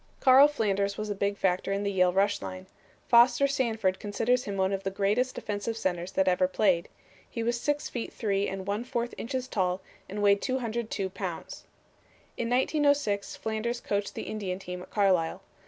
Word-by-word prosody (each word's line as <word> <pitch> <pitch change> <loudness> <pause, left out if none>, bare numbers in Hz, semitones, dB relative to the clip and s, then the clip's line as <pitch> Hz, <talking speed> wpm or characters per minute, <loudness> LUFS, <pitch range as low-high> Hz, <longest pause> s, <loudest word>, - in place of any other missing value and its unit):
'" - - -35
Carl 265 +2 +8
Flanders 200 -7 0
was 215 0 -3
a - - +1
big 200 0 -1
factor 185 0 0
in 200 +1 -1
the 200 - 0
Yale 180 -2 +3
rush 200 +2 +1
line. 185 0 -7 0.4
Foster 240 +3 +6
Sanford 225 -8 0
considers 230 +4 0
him 200 -1 -4
one 190 +1 +1
of 195 - -2
the 195 - -2
greatest 205 +7 0
offensive 210 +2 -3
centers 180 -3 -2
that 190 0 +2
ever 185 0 +3
played. 185 -3 +1 0.4
He 230 - -4
was 235 +1 -1
six 290 0 0
feet 240 - -5
three 200 -2 0
and 195 0 -5
one 205 +3 -2
fourth 240 -1 -3
inches 255 +1 -4
tall 185 -5 0 0.3
and 205 +1 -3
weighed 200 0 +4
202 230 -6 -2
pounds. - - -6 0.7
In 230 - -2
1906 265 -5 +1
Flanders 225 +2 -3
coached 200 -2 -2
the - - -4
Indian 195 -4 -4
team 180 -1 -7
at 180 - -11
Carlisle. 185 -6 +1
205 Hz, 185 wpm, -28 LUFS, 195-235 Hz, 0.7 s, Carl